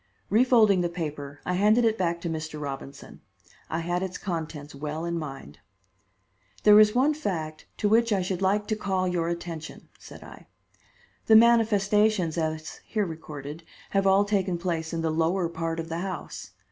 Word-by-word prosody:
Refolding 220 -4 +5
the 175 - 0
paper, 145 -4 -6
I 180 - -1
handed 210 +6 +4
it 220 -1 +3
back 170 -4 -1
to 170 - -4
Mr. 155 -1 -4
Robinson. 140 -1 -8 0.5
I 160 - -2
had 175 +2 -1
its 190 -1 -4
contents 160 -5 -5
well 150 +3 -5
in 170 0 -2
mind. 135 - -8 1.0
"There 210 0 +8
is 215 +1 +5
one 275 +5 +3
fact 165 - -4
to 210 - +1
which 230 +2 +3
I 195 -3 +2
should 185 0 -3
like 200 +2 +1
to 215 - +1
call 190 -3 -1
your 170 -2 -1
attention," 170 -2 -6
said - - -12
I. - - -13 0.8
"The 220 - +7
manifestations, 215 -5 +4
as 155 -1 -3
here 210 -2 -1
recorded, 155 -2 -8 0.3
have 195 0 +2
all 195 +1 +4
taken 195 -3 0
place 170 -2 -3
in 165 - -2
the 160 - 0
lower 165 +3 +1
part 165 0 -3
of 165 0 -5
the 165 +1 -3
house. 185 0 -6
175 Hz, 170 wpm, -26 LUFS, 160-205 Hz, 1.0 s, There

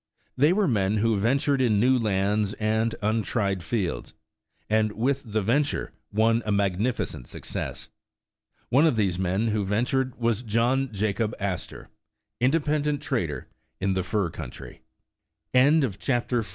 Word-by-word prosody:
They 145 +5 +4
were 200 +1 +2
men 105 -4 +1
who 110 +1 +2
ventured 135 +6 +1
in 110 -5 +3
new 130 +4 +4
lands 105 -2 +1
and 110 +1 0
untried 105 -3 0
fields, 90 +1 -3 0.5
and 110 0 +2
with 135 +5 0
the 110 -1 0
venture 140 +8 0 0.2
won 115 +2 +3
a 105 - -2
magnificent 100 - -1
success. - - -6 0.8
One 140 +7 +5
of 155 - +2
these 95 -5 0
men 95 +5 0
who 105 -1 0
ventured 125 +6 0
was 115 -2 0
John 120 +3 +1
Jacob 105 +1 -1
Astor, 95 -3 -4 0.5
independent 150 +2 +1
trader 120 - -2 0.3
in 95 0 0
the 95 - 0
fur 95 -2 -1
country. 75 -7 -9 0.7
104 130 -4 +3
CHAPTER 120 -2 +1
XV. 105 - -8
110 Hz, 140 wpm, -26 LUFS, 100-130 Hz, 0.8 s, One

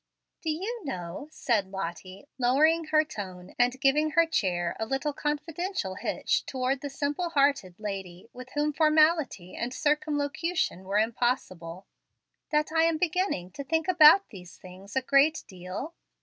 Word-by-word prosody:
"Do 325 - -3
you 400 +10 -3
know," 185 - -6
said 225 -10 0
Lottie, 190 - -6
lowering 310 +7 +3
her 310 0 +3
tone, 185 - -8
and 245 +2 +2
giving 295 +3 +3
her 335 +1 +5
chair 175 - -1
a 220 - -1
little 270 +4 -1
confidential 300 - -3
hitch 185 - -1
toward 260 0 -1
the 285 - -4
simple 290 +5 -2
hearted 275 - +1
lady 195 -3 -6
with 250 +1 -10
whom 295 +1 +1
formality 305 - +2
and 240 +1 -3
circumlocution 300 - -1
were 195 +2 0
impossible, 210 -6 -1 0.6
"that 300 0 +1
I 325 0 +3
am 330 -1 +2
beginning 330 - -1
to 280 - -7
think 320 +3 -1
about 350 +2 +7
these 180 -4 -12
things 185 +3 -12
a 265 - +1
great 280 +4 +3
deal?" 185 - -7
275 Hz, 150 wpm, -28 LUFS, 195-310 Hz, 0.6 s, about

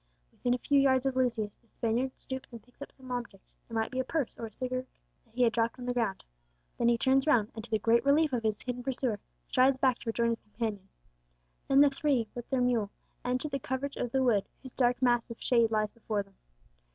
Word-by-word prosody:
Within 245 0 0
a - - -2
few 280 +3 +2
yards 265 -1 +3
of 265 -1 0
Lucius 235 -5 0
the 235 - -34
Spaniard 235 +4 -1
stoops 260 -1 -7
and 235 -2 -10
picks 250 +2 -28
up 285 - -7
some 260 -1 -12
object, 235 -6 -5 0.3
it - - -11
might 225 -1 0
be 260 - -2
a - - +2
purse 285 -1 -2
or 230 - -5
a - - -13
cigar 255 +3 -2
case, 260 - -19 0.4
that 225 -1 -30
he 250 - +3
had 235 -1 +3
dropped 230 +1 0
on 250 - -7
the 245 - 0
ground. 225 -6 -1 0.6
Then 235 - +3
he 235 0 +4
turns 265 +4 +3
round, 225 -8 +3
and, 220 - -7
to 235 - -11
the 220 - +2
great 230 +3 +3
relief 290 +1 +3
of 240 - +1
his 215 -2 -1
hidden 250 -1 -3
pursuer, 245 -4 -1 0.3
strides 260 +1 +4
back 260 -2 +2
to 235 - -5
rejoin 235 +1 +1
his 230 - -2
companions. 210 -3 -5 0.8
Then 275 +1 +6
the 285 -1 +6
three, 275 -6 +1
with 240 -1 -7
their 265 -2 +1
mule, 240 -5 +1 0.3
enter 250 +4 -1
the 275 -2 -3
covert 265 +2 -3
of 245 - -3
the 265 +1 +2
wood, 220 -6 +2 0.2
whose 260 - -8
dark 245 -1 +2
mass 240 -1 +3
of 230 - -8
shade 235 -3 +3
lies 215 -1 0
before 215 -3 -3
them. 195 0 -25
245 Hz, 245 wpm, -30 LUFS, 230-260 Hz, 0.8 s, Then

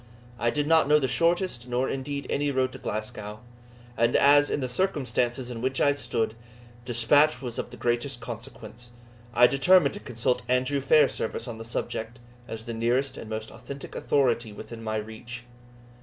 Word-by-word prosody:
I 120 - +2
did 145 +3 0
not 160 -1 +4
know 150 +1 +6
the 135 -3 +1
shortest, 170 -4 +1
nor 125 +1 0
indeed 140 +1 -4
any 145 +1 0
road 130 -2 +1
to 130 - -10
Glasgow; 105 -1 -5 0.5
and 115 +1 +2
as, 145 +1 +6
in - - 0
the 130 - -2
circumstances 125 -6 -1
in 115 -2 -6
which 130 +1 -1
I 145 - +4
stood, 115 -5 -2 0.5
despatch 135 +6 +3
was 120 -3 -5
of - - -4
the - - -11
greatest 120 +2 -1
consequence, 120 0 -9 0.4
I 120 0 +6
determined 140 +3 +5
to - - -7
consult 125 +1 -1
Andrew 130 +3 +1
Fairservice 135 -4 +2
on 115 -2 -6
the 115 - -7
subject, 115 0 -4 0.3
as 110 -1 -6
the 115 - -5
nearest 120 +4 0
and 110 - -8
most 110 0 -5
authentic 130 +5 -9
authority 120 -5 +1
within 115 +2 -9
my 110 -1 -2
reach. 110 +3 -6
125 Hz, 170 wpm, -27 LUFS, 115-140 Hz, 0.5 s, know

